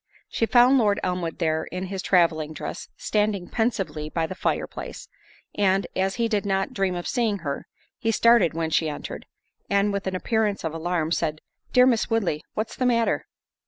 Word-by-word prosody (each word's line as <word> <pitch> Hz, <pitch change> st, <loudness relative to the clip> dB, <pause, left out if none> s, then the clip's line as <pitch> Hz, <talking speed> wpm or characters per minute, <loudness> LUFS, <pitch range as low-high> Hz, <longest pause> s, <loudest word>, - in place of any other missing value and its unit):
She 230 Hz, -, 0 dB
found 250 Hz, +3 st, +6 dB
Lord 205 Hz, -3 st, +2 dB
Elmwood 180 Hz, -2 st, -2 dB
there 160 Hz, -2 st, 0 dB
in 180 Hz, +1 st, -5 dB
his 190 Hz, 0 st, -4 dB
travelling 165 Hz, -5 st, +2 dB
dress, -, -, -6 dB
standing 210 Hz, -4 st, 0 dB
pensively 190 Hz, -10 st, -1 dB
by 165 Hz, +1 st, -1 dB
the 160 Hz, -, -5 dB
fire 185 Hz, -, -1 dB
place—and, 195 Hz, -1 st, -3 dB
as 190 Hz, +1 st, 0 dB
he 235 Hz, -1 st, +1 dB
did 210 Hz, -3 st, 0 dB
not 195 Hz, -1 st, -1 dB
dream 195 Hz, -2 st, 0 dB
of 175 Hz, -, -4 dB
seeing 225 Hz, -5 st, +1 dB
her, 140 Hz, -1 st, -3 dB, 0.3 s
he 225 Hz, -, -1 dB
started 230 Hz, -7 st, +4 dB
when 165 Hz, -1 st, -1 dB
she 160 Hz, 0 st, +2 dB
entered, 145 Hz, -, -7 dB, 0.4 s
and, 200 Hz, +1 st, +2 dB
with 200 Hz, -1 st, -3 dB
an 190 Hz, -, -1 dB
appearance 215 Hz, +1 st, 0 dB
of 160 Hz, -1 st, -2 dB
alarm, 165 Hz, -1 st, -1 dB
said, 155 Hz, -2 st, 0 dB, 0.3 s
"Dear 250 Hz, 0 st, +6 dB
Miss 235 Hz, -4 st, +2 dB
Woodley, 200 Hz, -10 st, 0 dB
what's 220 Hz, +1 st, -3 dB
the 255 Hz, -, +1 dB
matter?" 235 Hz, -2 st, +1 dB
195 Hz, 180 wpm, -25 LUFS, 165-220 Hz, 0.4 s, found